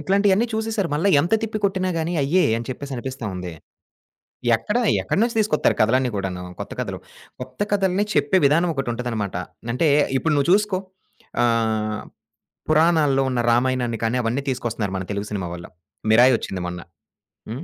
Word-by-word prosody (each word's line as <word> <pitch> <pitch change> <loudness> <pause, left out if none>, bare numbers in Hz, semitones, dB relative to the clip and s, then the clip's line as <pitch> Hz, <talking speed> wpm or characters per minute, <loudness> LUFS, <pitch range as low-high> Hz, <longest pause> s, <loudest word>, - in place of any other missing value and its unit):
ఇట్లాంటియన్నీ 200 +6 +2
చూసేసారు. 220 -4 -1
మళ్ళా 165 +7 +1
ఎంత 170 +8 +1
తిప్పి 220 -1 -2
కొట్టిన 190 -1 +1
గానీ 165 +2 -2
అయ్యే 170 +7 +3
అని 115 - -5
చెప్పేసి 140 +2 -6
అనిపిస్తా 130 -1 -5
ఉంది. 90 -1 -5 1.0
ఎక్కడా? 210 - -1 0.2
ఎక్కడి - - 0
నుంచి 235 0 0
తీసుకొత్తారు 210 -8 +2
కథలన్నీ 125 +4 +3
కూడాను 95 -2 -3 0.2
కొత్త - - -6
కథలు. - - -4 0.4
కొత్త 125 0 -9
కథల్ని 195 0 +2
చెప్పే 190 - +3
విధానం 165 +5 +3
ఒకటుంటదనమాట. 120 -7 -3 0.4
అంటే 155 +6 +2 0.3
ఇప్పుడు 160 +3 0
నువ్వు 140 0 +1
చూసుకో. 205 -1 +2 0.6
ఆహ్, 110 -2 0 0.7
పురాణాల్లో 155 -4 +3
ఉన్న 125 -2 0
రామాయణాన్ని 120 -1 +1
కానీ, 115 +2 +1
అవన్నీ 120 +5 -1
తీసుకొస్తున్నారు 115 -6 -2
మన 95 - -3
తెలుగు 100 0 -3
సినిమా 95 -4 -3
వళ్ళు. 85 0 -9 0.4
మిరాయొచ్చింది 115 -6 +3
మొన్న. 90 0 -5 0.7
హ్మ్. 125 +8 -5
130 Hz, 145 wpm, -22 LUFS, 115-180 Hz, 1.0 s, అయ్యే